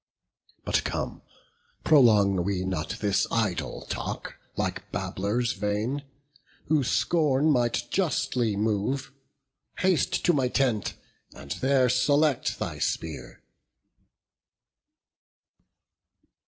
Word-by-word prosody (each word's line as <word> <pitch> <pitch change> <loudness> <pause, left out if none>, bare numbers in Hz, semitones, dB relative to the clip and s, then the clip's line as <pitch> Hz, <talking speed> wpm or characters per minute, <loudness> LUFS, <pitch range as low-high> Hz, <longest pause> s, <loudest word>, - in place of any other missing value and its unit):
But - - +1
come, - - -3 0.6
prolong 105 - +5
we 95 -1 -1
not 90 -4 -2
this 100 -1 +2
idle 110 -6 -2
talk, - - -5 0.2
Like - - -3
babblers 115 +5 -1
vain, 105 +7 -2 0.7
who 150 -3 +3
scorn 150 +1 +2
might 120 -3 +1
justly 130 - 0
move: 110 +6 -1 0.7
Haste 185 -3 +1
to 175 - +5
my 135 -4 +2
tent, 125 -5 0 0.4
and 70 0 -10
there 130 - +2
select 140 +3 +2
thy - - -4
spear." 80 -2 -4
120 Hz, 90 wpm, -27 LUFS, 100-140 Hz, 0.7 s, prolong